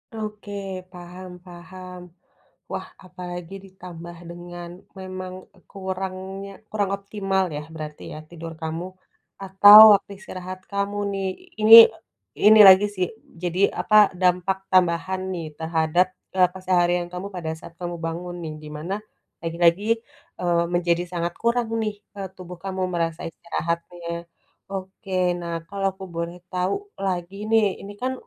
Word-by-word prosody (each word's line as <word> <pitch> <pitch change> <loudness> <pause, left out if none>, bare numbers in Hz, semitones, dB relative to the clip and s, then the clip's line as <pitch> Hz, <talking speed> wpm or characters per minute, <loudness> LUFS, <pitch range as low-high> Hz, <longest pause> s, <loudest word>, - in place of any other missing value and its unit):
Oke, 210 -1 -6 0.4
paham 180 +1 -10 0.2
paham. 180 +1 -10 0.7
Wah, - - -4 0.2
apalagi 180 0 -8
ditambah 175 -3 -11
dengan 175 0 -9 0.3
memang, 185 -1 -6 0.4
kurangnya 190 0 -5 0.2
kurang 205 -2 0
optimal 195 -1 -1
ya, - - -4
berarti 150 -1 -7
ya, 155 - -7
tidur 165 -1 -8
kamu 160 +2 -4 0.6
atau 205 +2 +9 0.2
waktu 200 0 -5
istirahat 185 -2 -8
kamu, 200 +1 -1 0.2
nih. 195 -1 -2 0.3
Ini 220 +1 +10 0.7
ini 215 0 +8
lagi 190 +2 +8
sih, 180 -1 0 0.4
jadi 175 +1 -2 0.2
apa, 215 - +1 0.3
dampak 180 +1 +2
tambahan 185 +1 +2
nih. 170 -2 -4
Terhadap, 160 +2 +2 0.3
eee, 180 -1 +5
keseharian 175 -1 +1
kamu 185 +3 -5
pada 160 -3 -3
saat - - -12
kamu 175 -1 -4
bangun 175 +2 -5
nih, 155 - -5
di - - -9
mana, 175 +6 -3 0.5
lagi-lagi, 170 +3 +2 0.6
eee, 170 -1 +2
menjadi 175 0 +1
sangat 170 0 -2
kurang 235 0 +1
nih, 210 -1 -2 0.2
eee, 190 - -4
tubuh 180 -1 -10
kamu 190 -1 -4
merasa 165 -1 -1
istirahatnya. 170 0 -5 0.4
Oke, 190 0 -7 0.3
nah 170 -1 -5
kalau 195 +1 -3
aku 190 0 -9
boleh 170 +1 -4
tahu 180 +1 0 0.3
lagi 180 0 -3 0.2
nih. 225 -1 +5 0.2
Ini 205 +1 -8
kan, 260 +1 -1
180 Hz, 130 wpm, -24 LUFS, 170-195 Hz, 0.7 s, Ini